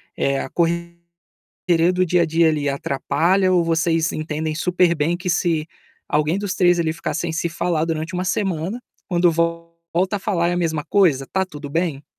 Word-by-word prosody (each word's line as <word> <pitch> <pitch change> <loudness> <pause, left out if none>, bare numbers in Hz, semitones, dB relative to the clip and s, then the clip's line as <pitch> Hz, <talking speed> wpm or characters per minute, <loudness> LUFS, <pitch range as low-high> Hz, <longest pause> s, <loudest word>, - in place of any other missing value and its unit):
Eh, 140 0 0
a - - -5
correria 170 0 -2 0.8
do 185 0 +2
dia 180 0 +2
a - - +3
dia 165 +1 +3
ali 150 -2 0
atrapalha 170 +7 +1
ou 175 -2 +4
vocês 165 0 +1
entendem 155 0 -3
super 180 +1 +2
bem 160 +3 0
que 180 +1 -5
se 165 -3 0 0.4
alguém 150 +4 +1
dos 200 -2 -3
3 175 -1 +3
ali 160 -1 0
ficar 165 - -4
sem 170 -1 -2
se 165 +1 -1
falar 170 -1 -1
durante 165 +1 -3
1 180 +1 -1
semana, 190 +3 -2 0.3
quando 175 -1 +3
volta 170 +3 -2
a - - -3
falar 185 -4 0
é - - 0
a - - -1
mesma 160 -4 -1
coisa, 160 -10 +3
está 190 +6 -1
tudo 145 -5 -9
bem? 160 -3 -1
170 Hz, 185 wpm, -21 LUFS, 160-180 Hz, 0.8 s, ou